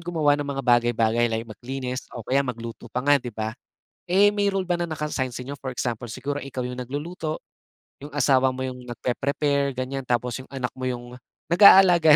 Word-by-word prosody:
gumawa 165 Hz, -4 st, +1 dB
ng 145 Hz, -, -4 dB
mga 135 Hz, -1 st, -3 dB
bagay-bagay 120 Hz, -1 st, +3 dB
like 115 Hz, 0 st, -2 dB
maglinis 125 Hz, +3 st, -6 dB
o 115 Hz, -, -7 dB
kaya 135 Hz, +2 st, +2 dB
magluto 115 Hz, -3 st, -5 dB
pa 125 Hz, +1 st, -3 dB
nga 145 Hz, -1 st, +5 dB
di 125 Hz, -, -6 dB
ba. 110 Hz, 0 st, -4 dB, 0.6 s
Eh 200 Hz, +3 st, +5 dB
may 205 Hz, -1 st, +1 dB
role 195 Hz, -1 st, 0 dB
ba 175 Hz, -1 st, 0 dB
na 175 Hz, -, -1 dB
naka-assign 150 Hz, -5 st, -3 dB
sa 125 Hz, -, -5 dB
inyo? 140 Hz, +2 st, -7 dB
For 130 Hz, -2 st, -5 dB
example 120 Hz, -1 st, -3 dB
siguro 145 Hz, +5 st, -4 dB
ikaw 130 Hz, -3 st, -5 dB
yung 125 Hz, 0 st, -5 dB
nagluluto, 155 Hz, +5 st, -4 dB, 0.6 s
yung 150 Hz, -, -8 dB
asawa 130 Hz, -2 st, +3 dB
mo 130 Hz, 0 st, -4 dB
yung 125 Hz, -1 st, -7 dB
nagpe-prepare 140 Hz, +4 st, -1 dB
ganyan, 130 Hz, +1 st, -4 dB
tapos 125 Hz, +1 st, -1 dB
yung -, -, -21 dB
anak 130 Hz, -2 st, -2 dB
mo 130 Hz, -, -8 dB
yung 120 Hz, -1 st, -4 dB, 0.4 s
nag-aalaga 175 Hz, -4 st, +8 dB
130 Hz, 195 wpm, -24 LUFS, 125-145 Hz, 0.6 s, nag-aalaga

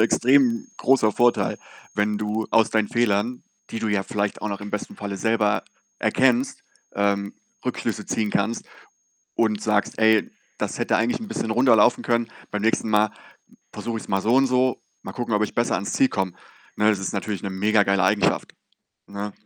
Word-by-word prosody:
extrem 120 Hz, +1 st, +3 dB
großer 125 Hz, -5 st, +3 dB
Vorteil, 120 Hz, +2 st, +2 dB, 0.4 s
wenn 105 Hz, 0 st, 0 dB
du 105 Hz, +1 st, -2 dB
aus 115 Hz, -1 st, +4 dB
deinen 110 Hz, -2 st, +1 dB
Fehlern, 120 Hz, +1 st, 0 dB, 0.3 s
die 115 Hz, -, -4 dB
du 110 Hz, -, -2 dB
ja 100 Hz, -2 st, +1 dB
vielleicht 100 Hz, +1 st, -3 dB
auch 105 Hz, -, -1 dB
noch 100 Hz, -1 st, -4 dB
im 105 Hz, -, -7 dB
besten 105 Hz, -, -5 dB
Falle 100 Hz, -1 st, -5 dB
selber 110 Hz, +1 st, +1 dB, 0.4 s
erkennst, 130 Hz, 0 st, +2 dB, 0.3 s
ähm, 100 Hz, 0 st, 0 dB, 0.3 s
Rückschlüsse -, -, -3 dB
ziehen 110 Hz, -2 st, -1 dB
kannst 110 Hz, +4 st, -1 dB, 0.7 s
und 110 Hz, -2 st, +1 dB
sagst: 105 Hz, -1 st, 0 dB
„Ey, 110 Hz, -1 st, +4 dB, 0.3 s
das -, -, -3 dB
hätte -, -, +1 dB
eigentlich 115 Hz, -, 0 dB
'n 220 Hz, -, -7 dB
bisschen 115 Hz, -, -3 dB
runder 120 Hz, +2 st, +4 dB
laufen 120 Hz, +3 st, +4 dB
können. 120 Hz, -1 st, 0 dB, 0.2 s
Beim 105 Hz, 0 st, -3 dB
nächsten 115 Hz, 0 st, +1 dB
Mal 105 Hz, 0 st, +3 dB, 0.6 s
versuche 115 Hz, -1 st, -4 dB
ich's -, -, -8 dB
mal 95 Hz, -1 st, 0 dB
so 115 Hz, +5 st, +2 dB
und 135 Hz, 0 st, +4 dB
so. 130 Hz, 0 st, +1 dB, 0.2 s
Mal -, -, -7 dB
gucken, 120 Hz, -3 st, -3 dB
ob 105 Hz, 0 st, +2 dB
ich -, -, -4 dB
besser 120 Hz, -, +1 dB
ans 100 Hz, -, -3 dB
Ziel 135 Hz, -, +4 dB
komme.“ 95 Hz, -3 st, -2 dB, 0.4 s
Ne, 105 Hz, 0 st, +4 dB
das 105 Hz, -3 st, +1 dB
ist 95 Hz, -, -4 dB
natürlich 105 Hz, -3 st, -3 dB
'ne 100 Hz, -, -2 dB
mega 105 Hz, +2 st, +2 dB
geile 100 Hz, -2 st, +2 dB
Eigenschaft, 100 Hz, +2 st, +1 dB, 0.5 s
ne? 100 Hz, +1 st, -5 dB
110 Hz, 185 wpm, -23 LUFS, 100-115 Hz, 0.7 s, aus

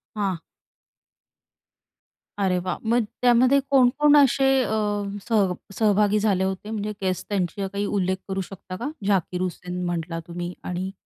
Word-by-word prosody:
हां. 195 Hz, -5 st, -1 dB, 2.0 s
अरे 185 Hz, -2 st, +2 dB
वाह! 185 Hz, -, -2 dB
मग 240 Hz, -1 st, +3 dB, 0.2 s
त्यामध्ये 250 Hz, +3 st, +5 dB
कोण 260 Hz, -3 st, +5 dB
कोण 295 Hz, 0 st, +6 dB
असे 275 Hz, -1 st, +4 dB, 0.2 s
अ, 220 Hz, -, -2 dB, 0.5 s
सह 205 Hz, -6 st, +2 dB, 0.2 s
सहभागी 210 Hz, -1 st, +3 dB
झाले 200 Hz, -3 st, +1 dB
होते 190 Hz, +2 st, -3 dB
म्हणजे 210 Hz, -1 st, -3 dB
गेस्ट 185 Hz, -1 st, -2 dB
त्यांची 195 Hz, 0 st, -1 dB
काही 200 Hz, +1 st, -1 dB
उल्लेख 185 Hz, -1 st, +1 dB
करू 190 Hz, 0 st, -2 dB
शकता 185 Hz, -1 st, -8 dB
का? 235 Hz, -, -4 dB, 0.2 s
झाकीर 185 Hz, -2 st, 0 dB
हुसेन 180 Hz, 0 st, -4 dB
म्हटला 170 Hz, -1 st, -3 dB
तुम्ही 175 Hz, +1 st, -5 dB
आणि 180 Hz, +1 st, -3 dB
195 Hz, 140 wpm, -24 LUFS, 180-220 Hz, 2.0 s, कोण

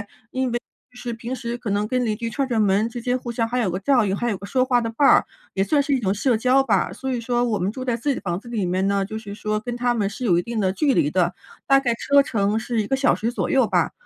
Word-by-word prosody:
为 205 Hz, -, -8 dB, 0.9 s
就 -, -, -12 dB
是 245 Hz, -1 st, -5 dB
平 235 Hz, +3 st, -5 dB
时 240 Hz, -1 st, -4 dB
可 225 Hz, -4 st, -4 dB
能 205 Hz, +1 st, +1 dB
跟 250 Hz, -1 st, 0 dB
邻 215 Hz, -1 st, 0 dB
居 230 Hz, +1 st, -4 dB
串 275 Hz, +4 st, -1 dB
串 230 Hz, -4 st, +1 dB
门 205 Hz, +2 st, +2 dB
之 235 Hz, 0 st, -7 dB
间 250 Hz, +1 st, 0 dB
互 245 Hz, -, -7 dB
相 230 Hz, -1 st, 0 dB
还 245 Hz, +2 st, -2 dB
有 215 Hz, -, +1 dB
个 180 Hz, -, -2 dB
照 245 Hz, -2 st, +3 dB
应， 195 Hz, 0 st, 0 dB
还 240 Hz, +3 st, -1 dB
有 200 Hz, -, -1 dB
个 200 Hz, -, -9 dB
说 255 Hz, +5 st, +1 dB
话 250 Hz, -2 st, +2 dB
的 230 Hz, -1 st, -2 dB
伴 275 Hz, +5 st, +2 dB
儿， -, -, +6 dB, 0.3 s
也 195 Hz, -, -1 dB
算 285 Hz, +8 st, +2 dB
是 285 Hz, -, -3 dB
一 260 Hz, -, +2 dB
种 195 Hz, -4 st, 0 dB
社 225 Hz, +3 st, +1 dB
交 255 Hz, +3 st, +3 dB
吧。 205 Hz, -8 st, +1 dB
所 265 Hz, -1 st, -4 dB
以 245 Hz, -, -1 dB
说 240 Hz, +1 st, 0 dB
我 225 Hz, -4 st, 0 dB
们 185 Hz, -, 0 dB
住 255 Hz, +5 st, -5 dB
在 245 Hz, -2 st, -1 dB
自 240 Hz, -, -8 dB
己 275 Hz, -, +3 dB
的 -, -, -6 dB
房 175 Hz, -1 st, -2 dB
子 240 Hz, -, -16 dB
里 225 Hz, -6 st, -2 dB
面 185 Hz, +2 st, 0 dB
呢， 200 Hz, 0 st, +1 dB
就 215 Hz, +2 st, -5 dB
是 205 Hz, -2 st, -8 dB
说 215 Hz, 0 st, -2 dB
跟 245 Hz, +1 st, -5 dB
他 245 Hz, 0 st, +1 dB
们 205 Hz, -4 st, 0 dB
是 235 Hz, +5 st, -7 dB
有 175 Hz, -6 st, +3 dB
一 -, -, 0 dB
定 235 Hz, +4 st, -5 dB
的 190 Hz, -3 st, +1 dB
距 280 Hz, +6 st, +1 dB
离 145 Hz, -7 st, +2 dB
的， 180 Hz, -1 st, +1 dB, 0.3 s
大 275 Hz, 0 st, +5 dB
概 240 Hz, -3 st, +1 dB
车 280 Hz, +3 st, +3 dB
程 210 Hz, -4 st, 0 dB
是 225 Hz, 0 st, -1 dB
1 205 Hz, -, -4 dB
个 270 Hz, -, +1 dB
小 265 Hz, 0 st, +3 dB
时 230 Hz, -, -1 dB
左 245 Hz, -, -2 dB
右 260 Hz, -5 st, +3 dB
吧， -, -, +1 dB
230 Hz, 335 characters per minute, -23 LUFS, 205-250 Hz, 0.9 s, 儿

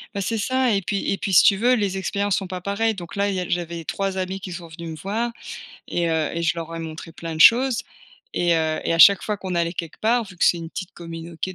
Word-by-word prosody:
Bah, 200 Hz, -, -1 dB
c'est 225 Hz, +4 st, -1 dB
ça 260 Hz, +4 st, +1 dB
et 195 Hz, -, -1 dB
puis 200 Hz, +2 st, -1 dB
et 195 Hz, -, 0 dB
puis, 195 Hz, -1 st, -3 dB
si -, -, +9 dB
tu 200 Hz, -, +5 dB
veux, 245 Hz, +5 st, +3 dB
les 200 Hz, -5 st, 0 dB
expériences 200 Hz, +1 st, -1 dB
sont 195 Hz, -, -3 dB
pas 180 Hz, 0 st, -6 dB
pareilles. 210 Hz, +4 st, 0 dB
Donc 175 Hz, -4 st, -9 dB
là, 200 Hz, 0 st, +1 dB
il 195 Hz, -, -2 dB
y -, -, -1 dB
a 180 Hz, -, -4 dB
j'avais 170 Hz, -1 st, -3 dB
3 195 Hz, +4 st, -2 dB
amis 185 Hz, +1 st, -3 dB
qui 190 Hz, -1 st, -8 dB
sont 175 Hz, -1 st, -7 dB
venus 165 Hz, +1 st, -8 dB
me -, -, -6 dB
voir 215 Hz, +9 st, -2 dB, 0.6 s
et 170 Hz, -1 st, 0 dB
heu 160 Hz, -2 st, 0 dB
et 170 Hz, -, -2 dB
je 165 Hz, -, +2 dB
leur 165 Hz, 0 st, -6 dB
ai -, -, -4 dB
montrés 165 Hz, 0 st, -7 dB
plein 165 Hz, 0 st, -6 dB
de 160 Hz, -, -6 dB
choses 240 Hz, +4 st, +6 dB, 0.5 s
et 175 Hz, -1 st, +2 dB
heu, 160 Hz, -1 st, 0 dB
et -, -, +1 dB
à 165 Hz, -, 0 dB
chaque 200 Hz, +4 st, +8 dB
fois 210 Hz, -2 st, -2 dB
qu'on 185 Hz, -2 st, -4 dB
allait 170 Hz, -1 st, 0 dB
quelque 170 Hz, -3 st, -6 dB
part, 235 Hz, +2 st, +2 dB
vu 185 Hz, -2 st, -13 dB
que -, -, +2 dB
c'est 175 Hz, -, +4 dB
une 165 Hz, -1 st, -7 dB
petite 185 Hz, +3 st, -7 dB
communauté- 165 Hz, +2 st, -7 dB
185 Hz, 280 wpm, -23 LUFS, 165-200 Hz, 0.6 s, si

